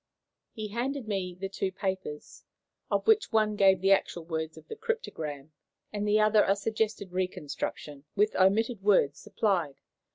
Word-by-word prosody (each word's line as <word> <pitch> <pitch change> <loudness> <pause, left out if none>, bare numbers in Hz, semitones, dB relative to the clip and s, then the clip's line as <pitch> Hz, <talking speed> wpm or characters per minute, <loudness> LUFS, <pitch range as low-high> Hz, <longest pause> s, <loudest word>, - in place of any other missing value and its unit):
] - - -59
He 215 -1 -6
handed 245 +3 -3
me 185 -4 -3
the 195 - -2
two 195 0 -3
papers, 190 -6 -5 0.5
of - - 0
which 440 -2 +4
one 215 -2 +2
gave 195 -2 +5
the 195 +1 +3
actual 175 -3 +1
words 160 -1 -4
of - - -14
the 450 - -6
cryptogram, 160 - -4 0.4
and 210 0 -2
the 210 +1 +4
other 215 0 +5
a 195 - +3
suggested 215 -2 -2
reconstruction, 150 -5 -4
with 210 +1 +2
omitted 210 +4 +2
words 165 -8 +3
supplied. 190 -8 0
195 Hz, 160 wpm, -29 LUFS, 180-215 Hz, 0.5 s, gave